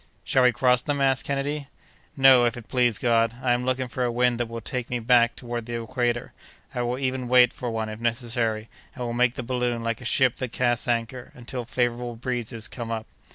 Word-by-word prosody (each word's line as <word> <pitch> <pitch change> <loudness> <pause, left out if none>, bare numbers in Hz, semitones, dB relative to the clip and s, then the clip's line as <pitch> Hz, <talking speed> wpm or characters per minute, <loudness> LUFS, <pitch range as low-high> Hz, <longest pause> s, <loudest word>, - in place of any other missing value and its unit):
"Shall 130 - +2
we 125 -1 +6
cross 125 +1 +3
them?" 145 +2 -2
asked 135 -1 +2
Kennedy. 140 +1 -2 0.5
"Not, 135 -2 +7
if 120 - -3
it 115 -2 -10
please 120 -3 +2
God. 115 -1 +2
I 130 -1 0
am 120 +1 0
looking 130 0 0
for 125 +1 -3
a 120 - +1
wind 120 0 +1
that 120 - -1
will 115 0 -6
take 120 +2 -4
me 125 - -1
back 120 0 +3
toward 120 -1 -5
the 120 0 -3
equator. 120 0 -2 0.4
I 125 - -2
will 120 +1 -1
even 130 -1 -2
wait 125 -1 +5
for 125 - -4
one, 110 -1 -2
if 110 0 -7
necessary, 115 -2 -1 0.3
and 125 - -5
will 120 - -3
make 125 +1 +2
the 130 - -4
balloon 120 -1 -1
like 115 +1 -2
a - - -9
ship 125 0 +2
that 130 -3 -4
casts 120 -2 0
anchor, 120 +1 -2
until 125 0 -6
favorable 120 0 -1
breezes 115 -2 -3
come 120 -2 -7
up." 110 -1 -3
120 Hz, 220 wpm, -25 LUFS, 115-125 Hz, 0.5 s, Not